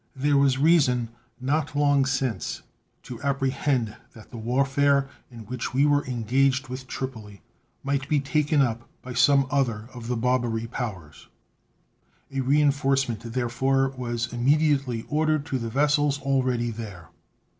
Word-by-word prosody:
There 145 +2 +1
was 140 -2 +3
reason 135 -6 +3 0.3
not 145 +3 -1
long 145 -2 +3
since 130 -7 -2 0.4
to 120 -2 -9
apprehend 135 -4 0 0.2
that 110 - -14
the 120 - -8
warfare 135 +4 +2 0.2
in 120 -3 -11
which 125 +3 -5
we 140 +2 +4
were 145 -1 +3
engaged 130 +3 +1
with 130 +1 -7
Tripoli 110 -8 -7 0.4
might 140 -1 -2
be 150 - +3
taken 145 +1 +2
up 120 -2 -3
by 125 - -7
some 135 +2 +4
other 120 -6 0
of 120 -2 -8
the 125 -1 -1
Barbary 120 -2 0
Powers. 105 - -6 1.0
A 135 - -3
reenforcement, 135 -3 +2
therefore, 130 +2 +1
was 120 -3 -4
immediately 135 -2 +1
ordered 155 -1 +1
to 130 - -2
the 115 -1 -4
vessels 145 +2 +2
already 130 -4 0
there. 105 -6 -8
130 Hz, 135 wpm, -25 LUFS, 120-140 Hz, 1.0 s, we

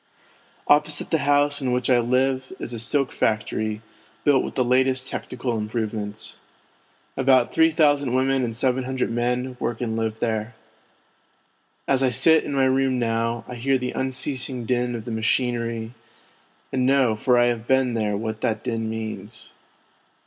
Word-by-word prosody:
Opposite 150 0 +2
the 160 - +2
house 145 0 +3
in 130 -2 -1
which 125 -1 0
I 125 -2 +4
live 130 +2 +1
l - - -10
is 120 - -6
a 115 - -4
silk 135 +4 0
factory, 110 0 -1 0.4
built 140 -3 +4
with - - -6
the 130 - +1
latest 130 +1 +2
technical 125 -3 -4
im 105 -1 -3
provements. 110 -2 -4 0.8
About 130 -2 +3
three 160 0 +5
thousand 145 -4 +2
women 135 0 +2
and 115 -2 -2
seven 130 +1 +1
hundred 130 -2 -2
men 125 +2 -1
work 120 -3 -2
and 115 -2 -2
live 110 -1 -2
there. 110 0 -2 1.3
As 135 -1 +2
I 130 - +3
sit 160 +6 +4
in 145 - -4
my 135 -1 +3
room 130 0 +2
now, 115 0 -1
I - - -7
hear 130 +3 +1
the 125 0 -3
unceasing 130 -1 -1
din 125 0 0
of 115 -1 -6
the 120 - -5
machinery, 115 0 -1 0.8
and 130 - +1
know 130 -5 +3
for 125 +3 +2
I 120 - +5
have 115 0 -10
been 130 -2 +2
there 105 -3 -1
what 110 0 -4
that 110 -1 -1
din 115 -2 -2
means. 110 0 -6
125 Hz, 170 wpm, -23 LUFS, 115-130 Hz, 1.3 s, three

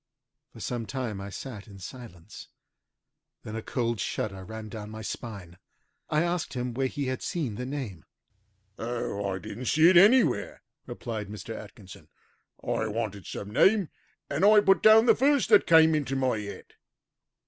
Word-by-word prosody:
For - - -14
some 120 -3 -4
time 120 -5 -4
I 100 - -6
sat 110 0 -8
in 100 -2 -12
silence. 95 -2 -11 1.0
Then 110 - -7
a 115 - -3
cold 120 -2 -2
shudder 95 0 -3
ran 110 +2 -8
down 105 -1 -8
my 110 0 -8
spine. 100 -6 -7 0.5
I 155 +2 +2
asked 170 -5 -2
him 125 -1 -3
where 135 +2 0
he 140 +1 -4
had 130 -1 -3
seen 150 -11 -3
the 125 +5 -5
name. 125 - -6 0.7
"Oh, 115 -4 -3
I 95 - -2
didn't 100 +7 -8
see 155 +2 +5
it 180 - +5
anywhere," 205 - +4 0.2
replied 110 -3 -5
Mr. 105 +3 -7
Atkinson. 100 -2 -12 0.6
"I 110 - -1
wanted 105 -3 -4
some 100 0 -6
name, 195 - +4 0.4
and - - -2
I 210 +1 +7
put 195 -3 +4
down 220 +1 +7
the - - +6
first 280 +2 +2
that - - +6
came 160 -1 +6
into 140 -3 -1
my 130 -4 0
head. 100 -1 -9
120 Hz, 165 wpm, -27 LUFS, 105-150 Hz, 1.0 s, I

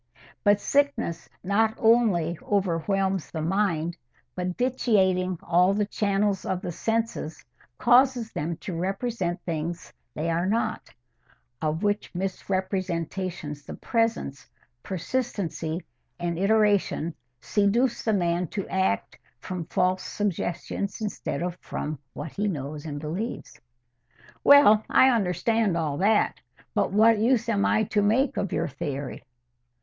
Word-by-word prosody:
But 205 0 +5
sickness 260 -14 0
not 220 +3 +2
only 215 -8 +3
overwhelms 190 -1 0
the 160 -2 -4
mind, 170 -2 0 0.4
but, 180 0 -3
vitiating 190 -8 +2
all 180 +3 +3
the 210 0 +1
channels 200 -1 0
of 185 -1 -2
the 180 - -3
senses, 225 -4 -2 0.3
causes 245 -2 +4
them 160 +2 -3
to 185 - -5
represent 190 0 -2
things 165 0 -3
as - - -25 0.2
they 165 +2 -1
are 170 +2 0
not, 220 +1 -1 0.7
of 155 +3 -1
which 205 -2 -1
misrepresentations 185 -4 -3
the - - -8
presence, 225 - -1 0.3
persistency, 185 - -3 0.4
and 170 -1 -2
iteration 200 -5 +2 0.3
seduce 215 - +1
the 220 - +1
man 175 -2 +1
to 200 +4 -4
act 190 - 0 0.2
from 180 +3 -5
false 185 +3 +1
suggestions 200 0 -3
instead 210 -4 -3
of 175 -1 -2
from 150 -2 -4
what 145 +1 -6
he 205 +1 -1
knows 150 -3 -4
and 145 -1 -4
believes." 175 +10 -5 0.8
"Well, 250 -7 +7
I 260 - +6
understand 215 -1 +1
all 150 -4 -1
that. 210 +3 +2 0.3
But - - +1
what 220 +2 +5
use 235 +1 +2
am 200 -3 +2
I 220 - +3
to 210 0 +1
make 240 +7 +2
of 195 - -1
your - - 0
theory?" 140 0 -5
190 Hz, 125 wpm, -26 LUFS, 170-220 Hz, 0.8 s, Well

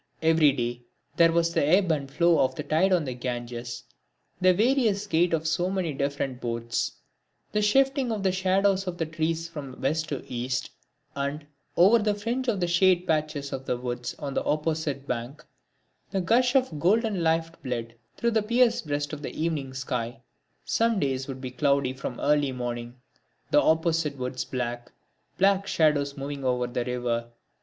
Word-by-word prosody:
Every 160 -2 +5
day 120 -2 -3 0.3
there 165 -1 +5
was 170 0 +1
the - - +2
ebb 180 +4 +4
and 140 -3 -1
flow 170 +3 +3
of 130 - -1
the 150 - -4
tide 160 +6 +2
on 175 -4 +3
the 130 - -3
Ganges; 120 -1 -5 0.6
the 185 0 +5
various 215 0 +2
gait 175 -3 +2
of 160 -1 0
so 175 +3 +1
many 185 -5 -1
different 140 -2 -2
boats; 115 - -2 0.6
the 210 - +1
shifting 270 +4 +2
of 210 -3 -2
the 190 - +3
shadows 190 +1 +2
of 175 -1 -3
the 165 - -1
trees 160 +1 -2
from 145 -6 -8
west 160 +3 -1
to 140 - -4
east; 125 +1 -3 0.4
and, 140 +2 -3 0.3
over 200 +7 +6
the 210 -1 +1
fringe 235 +5 -2
of 195 -7 +1
shade 180 +1 +3
patches 155 -4 -1
of 135 0 -5
the 125 - 0
woods 120 0 -4
on 140 -2 -5
the - - 0
opposite 150 -2 -1
bank, 125 +2 -5 0.6
the 195 - -1
gush 245 +8 +2
of 250 - +2
golden 205 +3 +2
life 165 0 +1
blood 120 -3 -4 0.2
through 235 - +1
the 220 -1 +2
pierced 235 -4 +2
breast 145 0 -2
of 150 - -5
the 150 - -6
evening 155 -5 -1
sky. 125 -1 -4 0.5
Some 230 -2 +2
days 135 -3 -1
would 130 -1 -6
be 130 -1 -5
cloudy 140 0 +1
from 130 -2 -6
early 145 -1 +2
morning; 120 -1 -5 0.6
the - - +6
opposite 160 -2 +1
woods 125 0 -3
black; 120 -1 -4 0.5
black 195 0 +3
shadows 145 -3 +2
moving 140 0 -5
over 125 -1 +1
the 120 0 -3
river. 120 -2 -2
155 Hz, 175 wpm, -26 LUFS, 130-185 Hz, 0.6 s, over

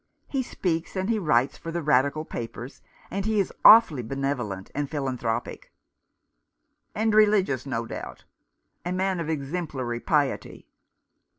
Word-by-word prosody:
He 270 - -1
speaks, 170 -9 -3
and 190 +4 -1
he 220 - +1
writes 140 -7 +1
for 165 - -6
the 170 0 -3
Radical 145 +1 +2
papers, 120 +1 -7 0.3
and 195 +1 -2
he 215 0 +1
is 195 - -1
awfully 215 - +8
benevolent 120 -6 -3
and 145 -1 -2
philanthropic 125 -5 -3 0.5
" - - -53
" - - -49
And 220 +1 +1
religious, 200 - +3
no 115 -3 -2
doubt? - - -8 0.6
A 175 - -3
man 190 0 0
of 165 -2 -3
exemplary 140 -5 -3
piety." 145 0 -1
150 Hz, 140 wpm, -26 LUFS, 130-190 Hz, 0.6 s, awfully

